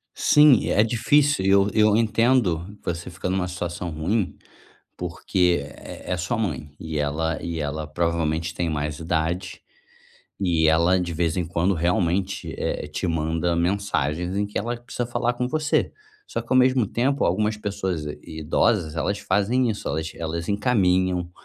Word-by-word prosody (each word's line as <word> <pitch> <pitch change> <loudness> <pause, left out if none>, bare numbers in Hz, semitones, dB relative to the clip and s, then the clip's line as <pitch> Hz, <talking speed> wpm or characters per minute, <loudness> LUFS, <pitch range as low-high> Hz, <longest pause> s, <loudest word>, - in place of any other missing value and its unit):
Sim, 150 -5 +5
é 105 - +4
difícil. 125 +2 +2
E - - +3
eu 100 +1 +5
eu 105 -1 +4
entendo, 110 -5 +1
você 85 +1 -4
fica 90 +1 -4
numa 95 -1 0
situação 90 -1 -4
ruim 90 +5 -1 0.6
porque 90 0 0
é 70 +5 -8
é - - +1
sua 90 +5 -2
mãe. 75 -8 -3
E 80 -2 -4
ela 75 +2 -1
e 85 -1 -3
ela 75 +1 -3
provavelmente 80 0 -1
tem 85 -1 -1
mais 75 0 -3
idade, 85 +2 -2 0.8
e 85 -4 +2
ela 85 +3 +4
de 85 -2 -3
vez 85 +1 0
em 90 - 0
quando 85 +3 +1
realmente, 90 +3 0
eh, - - -2
te 75 +5 -3
manda 80 +1 0
mensagens 90 -2 -1
em 100 0 +1
que 105 - -4
ela 120 +3 -2
precisa 120 0 -5
falar 120 0 0
com 125 +1 -2
você. 155 +3 0 0.3
Só - - -3
que - - -18
ao 130 - +5
mesmo 130 -2 +4
tempo 135 +7 0
algumas 105 +4 +1
pessoas 95 -6 -3 0.2
idosas 80 +2 0
elas 100 +5 -1
fazem 115 +6 +1
isso, 105 - -4
elas 80 +2 -2
elas 85 +2 -4
encaminham 95 -5 +1
90 Hz, 160 wpm, -24 LUFS, 80-105 Hz, 0.8 s, Sim